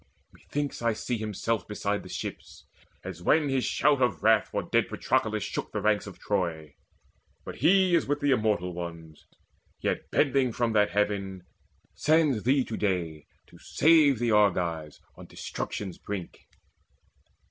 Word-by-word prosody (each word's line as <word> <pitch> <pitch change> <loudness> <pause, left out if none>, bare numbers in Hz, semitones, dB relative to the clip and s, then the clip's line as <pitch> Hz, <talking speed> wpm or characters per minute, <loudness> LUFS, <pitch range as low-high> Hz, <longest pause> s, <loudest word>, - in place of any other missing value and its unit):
Methinks 145 -3 -5
I 115 -1 +1
see 115 +2 -3
Himself 110 -1 -2
beside 105 -1 -2
the - - -12
ships, - - -7 0.4
as 90 -2 -7
when 150 - +3
his 135 -2 0
shout 140 -1 +2
Of 105 -11 0
wrath - - +4
for - - -2
dead - - +1
Patroclus - - 0
shook - - -4
the 105 - -2
ranks 105 0 +1
Of 100 - -10
Troy. 85 -7 -2 0.7
But - - -7
he 190 0 +4
is 170 - +3
with 145 +1 0
the 145 -1 +1
Immortal 105 -7 +1
Ones, 85 -3 -8 0.5
Yet, - - -2
bending 135 -4 +2
from 120 -1 0
that 105 -1 +3
heaven, 100 -3 -1 0.5
sends 155 -7 +2
thee 130 +3 +2
to 110 - -5
day 85 -7 -2 0.2
To - - -18
save 155 -4 +4
the 120 0 0
Argives 85 -7 +1 0.2
on - - -12
destruction's 95 -4 -6
brink." 100 -4 -7
105 Hz, 150 wpm, -27 LUFS, 90-135 Hz, 0.7 s, wrath